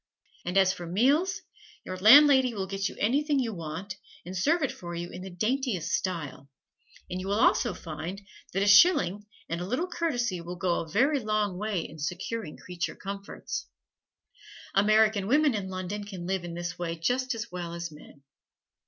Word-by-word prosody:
And 180 +2 -1
as 190 -1 +5
for 175 -2 -8
meals, 280 - +2 0.4
your 185 - -4
landlady 260 +4 +7
will 195 -2 -2
get 195 +1 -2
you - - -11
anything 285 +6 +1
you 240 -4 0
want 170 +3 -6 0.3
and 180 +2 -7
serve 310 - +2
it 275 - 0
for 175 -1 -8
you 175 +1 -5
in 180 - -8
the 190 - -7
daintiest 215 - -1
style, 155 -7 -3 0.6
and 180 +1 -4
you 190 - -6
will 200 +2 +1
also 235 -2 +3
find 165 +4 -6 0.3
that 195 +2 0
a - - +1
shilling 205 - +5 0.2
and 170 +1 -3
a 180 - -4
little 255 - 0
courtesy 245 - -1
will 175 +1 -6
go 175 0 0
a 160 - -6
very 275 - +3
long 215 -4 0
way 205 -1 -2
in 155 - -12
securing 180 +3 -4
creature 180 -2 -5
comforts. 200 0 -6 1.1
American 210 0 +4
women 290 +3 +4
in 200 -3 -3
London 185 +2 -4
can 190 -4 -7
live 190 0 -1
in 170 -1 -6
this 175 +1 -5
way 170 -1 -2
just 250 +9 0
as 230 0 -6
well 175 -2 -5
as 170 -1 -5
men. 150 -2 -15
195 Hz, 180 wpm, -28 LUFS, 175-235 Hz, 1.1 s, landlady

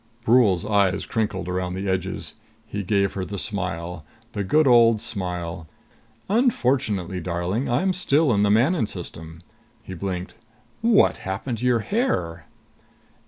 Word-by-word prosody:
Brule's 110 -7 +4
eyes 100 -2 +2
crinkled 100 -5 -2
around 90 0 -2
the 95 +1 -4
edges. 95 0 -3 0.3
He 100 - -4
gave 100 0 +1
her 95 - -3
the 100 +3 -5
smile. 90 -5 -3 0.3
The 100 - -3
good 155 +11 +3
old 115 -3 +6
smile. 90 -7 -5 0.6
"Unfortunately, 130 - +1
darling, 90 +8 -2
I'm 185 +11 +1
still 155 -6 +2
in 100 - +2
the 105 - +3
Manon 120 - +3
System." 80 -2 -9 0.4
He 95 - -8
blinked. 90 0 -4 0.5
"What 230 -2 +4
happened 105 +5 -4
to 125 - 0
your 120 -2 +3
hair?" 90 - -1
100 Hz, 135 wpm, -23 LUFS, 90-120 Hz, 0.6 s, old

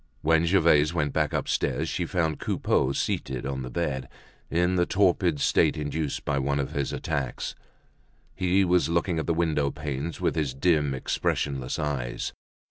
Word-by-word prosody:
When 80 +1 +3
Gervaise 80 -3 +4
went 75 -4 0
back - - +1
upstairs, 70 +4 0
she 85 0 -2
found 80 -4 0
Coupeau 65 - +1
seated 65 -1 -2
on 65 -1 -3
the 65 - -5
bed, 70 -3 -2 0.4
in 90 +2 +2
the 90 -1 +2
torpid 90 -5 +2
state 80 +2 +3
induced 75 0 -3
by 70 -1 0
one 70 +1 0
of 70 - -2
his 70 -1 -2
attacks. 70 -5 -3 0.8
He 95 +1 +2
was 90 -4 +3
looking 85 0 +1
at - - -3
the 85 - +1
window 80 -4 +1
panes 75 +2 -4
with - - +1
his 70 -5 -1
dim 75 -2 +2
expressionless 65 0 -1
eyes. 70 -5 -3
75 Hz, 160 wpm, -26 LUFS, 70-85 Hz, 0.8 s, Gervaise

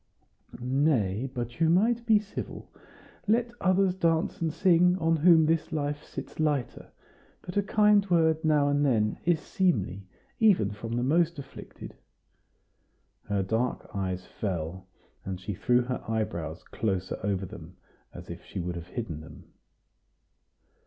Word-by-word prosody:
"Nay, 125 -4 +1
but 120 0 -5
you 165 -1 +4
might 230 +7 +2
be 220 -2 +6
civil. 210 0 -6 0.6
Let 235 +2 +2
others 185 0 +3
dance 165 -3 0
and 165 -1 0
sing, 180 +1 +4
on 165 -2 +2
whom 160 0 +6
this 160 0 0
life 145 -1 -2
sits - - -9
lighter; 150 -5 -1 0.5
but 180 - -8
a 205 - +4
kind 210 0 +4
word 160 -2 +3
now 150 -2 +3
and 145 0 +2
then 110 -6 +1
is 170 -2 +3
seemly 100 - -1 0.3
even 195 - +4
from 110 +3 -6
the 120 +1 0
most 165 +4 +2
afflicted." 140 -1 -10 1.3
Her 100 -1 0
dark 115 +6 -2
eyes 95 -2 -3
fell, 95 -2 -4 0.4
and 95 -1 -5
she 100 +2 -5
drew 125 +6 +2
her 125 +1 -4
eyebrows 85 -8 -3
closer 95 -4 -3
over 95 -1 -1
them, 90 -2 -11 0.3
as - - -11
if - - -9
she - - -7
would 90 0 -3
have 85 +1 -8
hidden 105 -11 -5
them. 80 0 -14
135 Hz, 145 wpm, -28 LUFS, 100-170 Hz, 1.3 s, be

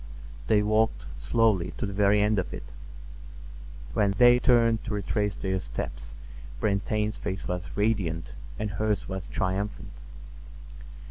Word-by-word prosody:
They 105 -1 +4
walked 110 +1 +1
slowly 110 - +2
to - - -2
the 100 - -4
very 100 +1 +4
end 105 -1 +2
of 90 - -3
it. - - -8 1.3
When 100 +5 +2
they 120 +1 +7
turned 115 -3 +3
to 115 - -2
retrace 105 0 -1
their 95 -2 -2
steps 95 - -6 0.4
Brantain's 105 +1 0
face 95 -2 -4
was 90 +2 -4
radiant 100 -7 0 0.3
and 105 -1 -3
hers 105 0 -1
was 95 0 -5
triumphant. 95 +3 -3
105 Hz, 130 wpm, -27 LUFS, 95-110 Hz, 1.3 s, they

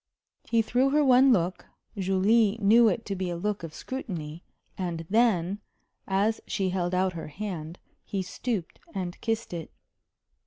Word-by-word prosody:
He 230 -1 +3
threw 250 +4 +2
her 295 +1 +3
one 260 +1 +6
look 180 -4 0 0.3
Julie 200 +3 +3
knew 225 +3 +6
it 225 +1 0
to 200 - -3
be 185 -1 -2
a 175 - -2
look 210 +3 -2
of 165 -2 -6
scrutiny 170 - -6 0.3
and 170 -3 -3
then, 205 -4 +2 0.5
as 200 +3 +1
she 190 -2 0
held 180 -1 -1
out 185 0 +1
her 160 -2 -6
hand, 170 -1 -6 0.3
he 195 -2 -3
stooped 195 -1 -4 0.2
and 180 -2 -4
kissed 225 -3 -2
it. 165 -2 -5
195 Hz, 155 wpm, -27 LUFS, 175-225 Hz, 0.5 s, one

